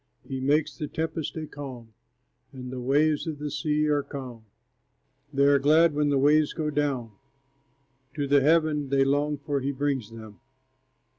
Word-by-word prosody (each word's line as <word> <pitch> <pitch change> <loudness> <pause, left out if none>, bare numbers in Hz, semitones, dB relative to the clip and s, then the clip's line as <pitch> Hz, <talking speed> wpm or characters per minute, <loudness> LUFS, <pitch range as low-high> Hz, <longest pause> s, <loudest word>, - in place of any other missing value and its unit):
He 130 - -4
makes 145 +4 +1
the 150 - -5
tempest 160 0 -4
a 155 - -4
calm, 130 -7 -9 0.6
And 125 -2 -8
the 130 - -5
waves 145 +5 +1
of 155 -2 -4
the 150 0 -5
sea 150 0 0
are 145 -1 +1
still. 130 -5 -8 0.9
They 140 -1 +2
are 140 0 +5
glad 155 +3 +4
when 150 0 +1
the 140 - +2
waves 150 +2 +3
go 155 -2 -2
down; 140 -6 -1 1.0
To 145 - -1
the 140 0 +4
haven 155 -1 +2
they 135 0 +3
long 145 +2 0
for 140 0 -2
he 135 +1 -2
brings 135 -5 -2
them. 110 -2 -12
145 Hz, 165 wpm, -26 LUFS, 135-150 Hz, 1.0 s, are